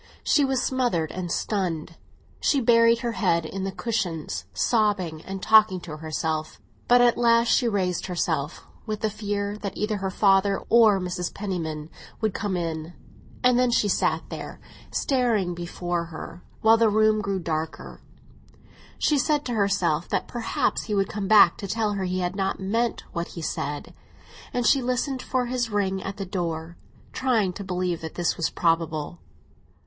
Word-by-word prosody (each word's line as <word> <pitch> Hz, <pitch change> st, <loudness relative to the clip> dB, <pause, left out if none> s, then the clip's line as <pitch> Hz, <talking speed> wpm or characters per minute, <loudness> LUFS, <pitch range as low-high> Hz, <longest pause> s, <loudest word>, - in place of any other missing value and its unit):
She 295 Hz, -, +3 dB
was 265 Hz, -2 st, +1 dB
smothered 240 Hz, -12 st, 0 dB
and 180 Hz, -2 st, -4 dB
stunned; 175 Hz, -6 st, -2 dB, 0.5 s
she 280 Hz, -, +2 dB
buried 230 Hz, -1 st, +4 dB
her 240 Hz, -2 st, -1 dB
head 175 Hz, -7 st, +1 dB
in 190 Hz, +4 st, -4 dB
the 195 Hz, -, -2 dB
cushions, 165 Hz, -, -3 dB
sobbing 185 Hz, -, 0 dB
and 195 Hz, 0 st, -6 dB
talking 215 Hz, -4 st, +5 dB
to 155 Hz, -3 st, -7 dB
herself. 155 Hz, 0 st, -3 dB, 0.3 s
But 245 Hz, 0 st, +6 dB
at 240 Hz, -1 st, +4 dB
last 235 Hz, -1 st, +4 dB
she 245 Hz, -, +3 dB
raised 185 Hz, -5 st, -1 dB
herself, 165 Hz, -4 st, -2 dB, 0.2 s
with 215 Hz, -1 st, -3 dB
the 215 Hz, -, 0 dB
fear 205 Hz, 0 st, -3 dB
that 200 Hz, -2 st, -5 dB
either 210 Hz, 0 st, -1 dB
her 190 Hz, -1 st, -2 dB
father 195 Hz, 0 st, +3 dB
or 220 Hz, -4 st, +6 dB
Mrs. 180 Hz, -1 st, -3 dB
Penniman 165 Hz, -6 st, -4 dB, 0.3 s
would 220 Hz, -3 st, 0 dB
come 200 Hz, -3 st, -2 dB
in; 165 Hz, -1 st, -4 dB, 0.5 s
and 250 Hz, -1 st, +4 dB
then 250 Hz, -1 st, +3 dB
she 225 Hz, -3 st, +2 dB
sat 200 Hz, -, +1 dB
there, -, -, -7 dB, 0.3 s
staring 230 Hz, -9 st, +1 dB
before 175 Hz, 0 st, -3 dB
her, 170 Hz, +1 st, -9 dB, 0.2 s
while 225 Hz, +1 st, +6 dB
the 225 Hz, -1 st, +4 dB
room 215 Hz, 0 st, +3 dB
grew 200 Hz, -1 st, -1 dB
darker. 160 Hz, -2 st, -4 dB, 1.0 s
She 295 Hz, -2 st, +2 dB
said 295 Hz, +2 st, +1 dB
to 245 Hz, -, -2 dB
herself 195 Hz, -6 st, +1 dB
that -, -, -1 dB
perhaps 240 Hz, -2 st, -1 dB
he 210 Hz, -, -2 dB
would 195 Hz, -1 st, +1 dB
come 205 Hz, -2 st, -3 dB
back 205 Hz, -5 st, +7 dB
to 200 Hz, -, -6 dB
tell 215 Hz, +1 st, 0 dB
her 195 Hz, -2 st, -2 dB
he 185 Hz, 0 st, -1 dB
had 180 Hz, +1 st, -2 dB
not 195 Hz, -1 st, -1 dB
meant 225 Hz, +5 st, -1 dB
what 170 Hz, 0 st, -2 dB
he 165 Hz, -, -8 dB
said; 145 Hz, -1 st, -4 dB, 0.6 s
and 245 Hz, -1 st, -1 dB
she 275 Hz, -, +4 dB
listened 255 Hz, +2 st, -1 dB
for 255 Hz, -1 st, -1 dB
his 245 Hz, -1 st, -1 dB
ring 195 Hz, -2 st, 0 dB
at 195 Hz, +1 st, -6 dB
the 195 Hz, -, -4 dB
door, 170 Hz, -3 st, -4 dB, 0.4 s
trying 225 Hz, -8 st, +1 dB
to 200 Hz, -, -7 dB
believe 180 Hz, -2 st, -2 dB
that 160 Hz, -1 st, -7 dB
this 175 Hz, -2 st, 0 dB
was 170 Hz, -, 0 dB
probable. 165 Hz, -1 st, -1 dB
195 Hz, 170 wpm, -25 LUFS, 175-225 Hz, 1.0 s, back